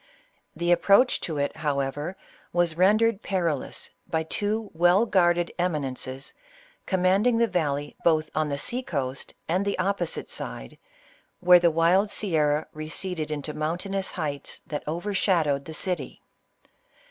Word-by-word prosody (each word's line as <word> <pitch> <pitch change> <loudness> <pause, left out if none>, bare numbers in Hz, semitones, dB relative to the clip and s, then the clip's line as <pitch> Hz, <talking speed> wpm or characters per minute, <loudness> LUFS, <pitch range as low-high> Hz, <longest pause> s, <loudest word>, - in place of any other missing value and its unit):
The 175 0 0
approach 200 +8 +4
to 160 -3 -3
it, 145 +2 -1
however, 145 +3 -2 0.3
was 175 -2 +1
rendered 210 +4 +3
perilous 170 -7 -2 0.2
by 160 -1 0
two 210 +6 -2
well 175 +6 +4
guarded 175 -4 +2
eminences, 135 -5 -2 0.5
commanding 195 +5 +3
the 235 - +4
valley 145 -8 -2
both 155 -2 +2
on 155 -1 0
the 140 - -2
sea 245 - -1
coast 135 - -4
and 180 +4 +1
the 200 0 -1
opposite 200 - -1
side, - - -6 0.6
where 180 0 +7
the 170 0 +4
wild 170 +5 +3
sierra 155 -7 +1
receded 155 +1 -4
into 150 0 -4
mountainous 180 +6 -3
heights 145 -5 -5
that 150 - -4
overshad 175 +1 +1
owed 140 -1 -1
the 160 - -7
city. 180 0 -3
170 Hz, 135 wpm, -26 LUFS, 150-190 Hz, 0.6 s, where